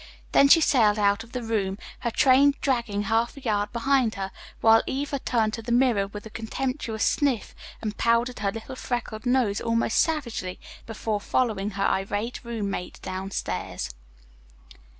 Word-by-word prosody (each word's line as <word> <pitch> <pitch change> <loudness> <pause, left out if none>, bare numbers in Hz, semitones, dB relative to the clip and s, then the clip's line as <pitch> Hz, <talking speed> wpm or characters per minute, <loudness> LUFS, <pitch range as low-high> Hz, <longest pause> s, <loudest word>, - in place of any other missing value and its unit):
Then 280 - +6
she 330 +4 +7
sailed 220 -8 +4
out 205 +1 +2
of 230 - -17
the 250 -1 -4
room, 200 -4 -1 0.2
her 235 - -1
train 275 +3 +5
dragging 235 -6 0
half 225 +5 0
a - - -6
yard 210 -5 -1
behind 245 -1 +1
her, 195 -1 -4 0.3
while 225 0 +6
Eva 280 +1 -2
turned 225 -4 0
to 230 - -4
the 235 - -5
mirror 240 -5 +3
with 205 +2 -9
a 220 - -9
contemptuous 230 0 -2
sniff 275 -7 0 0.3
and 210 -1 -3
powdered 235 +2 +1
her 200 -1 0
little 225 +5 -7
freckled 240 -2 -4
nose 245 -5 +2
almost 230 -1 +1
savagely 235 - -1 0.3
before 220 -2 -2
following 210 -4 0
her 195 - +1
irate 205 +5 -1
roommate 205 -6 -4
down 185 +1 -4
stairs. 65 - -4
225 Hz, 160 wpm, -26 LUFS, 205-250 Hz, 0.3 s, she